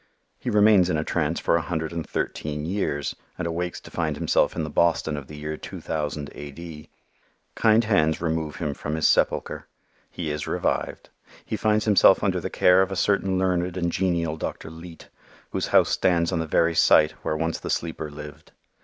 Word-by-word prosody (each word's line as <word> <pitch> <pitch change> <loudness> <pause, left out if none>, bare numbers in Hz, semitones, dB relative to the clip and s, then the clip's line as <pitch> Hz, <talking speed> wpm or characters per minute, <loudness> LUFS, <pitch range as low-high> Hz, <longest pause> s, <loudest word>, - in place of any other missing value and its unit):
He - - -4
remains 105 -4 +5
in 80 - +1
a 75 - -1
trance 80 0 -1
for - - +1
a 85 - +2
hundred 80 0 -3
and 85 -1 -3
thirteen 75 0 -3
years 80 -6 -2 0.2
and 90 - -3
awakes 85 +1 -3
to - - -13
find - - -2
himself - - +1
in 80 - -2
the 75 - -4
Boston 80 -1 +1
of 70 -2 -7
the 75 - -10
year 75 +1 -5
2000 75 -2 -5
A. 75 0 -8
D. 80 +1 -10 0.6
Kind 110 +1 +4
hands 80 -8 +2
remove 80 -2 -2
him 75 -4 -3
from 75 +2 -4
his 80 - +2
sepulcher. - - +1 0.4
He 80 -4 -4
is 75 0 -4
revived. - - -2 0.4
He - - -3
finds 110 0 +1
himself 105 -3 +5
under - - +1
the - - -4
care 90 +1 +4
of 95 +1 0
a - - -2
certain 95 -1 +1
learned 90 -1 0
and 85 -1 0
genial 85 -4 0
Dr. 80 - -5
Leete, 80 0 -12 0.4
whose - - -2
house - - +4
stands 85 -1 +2
on 85 - 0
the 80 - -2
very 85 +2 +2
site 75 -1 +5
where 75 - -2
once 80 +1 -2
the - - -6
sleeper 80 -2 -3
lived. 75 0 -11
85 Hz, 195 wpm, -24 LUFS, 75-90 Hz, 0.6 s, remains